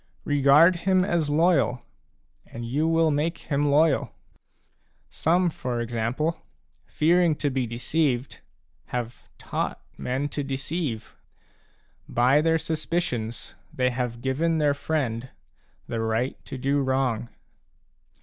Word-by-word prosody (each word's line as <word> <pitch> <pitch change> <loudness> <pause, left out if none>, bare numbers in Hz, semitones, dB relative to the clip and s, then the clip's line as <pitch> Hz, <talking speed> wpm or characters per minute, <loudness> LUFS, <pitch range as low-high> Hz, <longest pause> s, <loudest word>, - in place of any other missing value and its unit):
Regard 145 +5 +5
him 185 +1 +2
as 170 -6 0
loyal, 145 -6 +2 0.6
and 115 0 -7
you 145 +7 0
will 165 -1 +3
make 155 +4 0
him 145 0 -1
loyal. 150 0 +2 1.0
Some, 175 +2 +2
for 125 -5 -3
example, 120 +7 -2 0.5
fearing 170 +1 +3
to 145 -1 -1
be 130 -2 -1
deceived, 125 +2 -1 0.5
have 120 -1 -5
taught - - -3 0.2
men 130 +3 -1
to 145 - -3
deceive; 135 -3 -4 0.9
by 130 +5 +4
their 165 +1 +3
suspicions 155 -8 -3 0.2
they 125 0 +1
have 120 -1 -3
given 160 +6 0
their 150 -2 +3
friend 130 -5 -2 0.6
the 115 - -4
right 115 +3 -1
to - - -6
do 140 +2 +1
wrong. 130 -3 0
140 Hz, 115 wpm, -25 LUFS, 125-160 Hz, 1.0 s, Regard